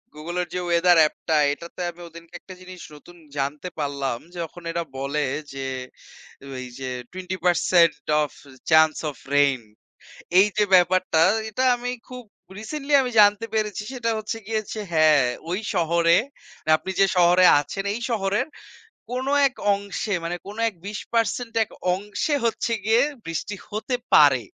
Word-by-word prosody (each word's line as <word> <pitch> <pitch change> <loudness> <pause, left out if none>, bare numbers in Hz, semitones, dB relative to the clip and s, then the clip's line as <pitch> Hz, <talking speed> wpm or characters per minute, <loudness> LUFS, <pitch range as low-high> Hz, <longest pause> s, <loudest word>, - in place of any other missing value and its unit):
Google 165 +4 -6
এর 175 - -4
যে - - 0
Weather 175 +1 +5
অ্যাপটা 155 +1 +1 0.2
এটাতে 170 +4 -11
আমি 170 - -21
ওই - - -16
দিনকে 170 +1 -14
একটা 190 - -11
জিনিস 185 0 -11 0.2
নতুন 175 +4 -16 0.2
জানতে 140 +5 -3
পারলাম, 140 -4 -2 0.2
যখন 170 +1 -6
এরা 170 0 -2
বলে 140 +3 -2 0.3
যে 135 - -7 1.0
ওই 130 0 -6
যে 130 - -5 0.2
20% 180 -2 +2 0.3
অফ 150 - -3 0.4
চান্স 160 0 +6 0.2
অফ 140 - -18 0.2
রেইন, 140 -3 +3 0.8
এই 200 - +6
যে 210 - +4
ব্যাপারটা, 180 -2 +3 0.3
এটা 235 +4 -2
আমি 245 +1 -4 0.2
খুব 250 -1 -8 0.4
রিসেন্টলি 290 +6 -4
আমি 250 -1 -3
জানতে 205 +2 +4
পেরেছি। 210 -1 -1
সেটা 245 -3 -2
হচ্ছে 215 +1 -4
গিয়ে 220 -1 -1
যে 215 - -4
হ্যাঁ, 155 -4 +5 0.2
ওই 180 +3 -1 0.2
শহরে 170 0 +3 0.5
মানি 155 - 0
আপনি 190 - -6
যে - - +7
শহরে 180 +1 +5
আছেন, 195 +7 -5
এই - - -4
শহরের 210 +3 0 0.6
কোনো 260 +2 -2 0.2
এক 260 - -27 0.2
অংশে 200 +1 -4
মানে 170 +1 -3
কোনো 210 +3 -8
এক 210 - -19
২০% 230 +2 -2
এক - - -14 0.2
অংশে 205 - -2
হচ্ছে 230 +1 -1
গিয়ে, 225 +2 +4 0.2
বৃষ্টি 165 +5 -4 0.2
হতে 220 +4 -2 0.2
পারে। 140 -4 +6
180 Hz, 155 wpm, -23 LUFS, 160-215 Hz, 1.0 s, যে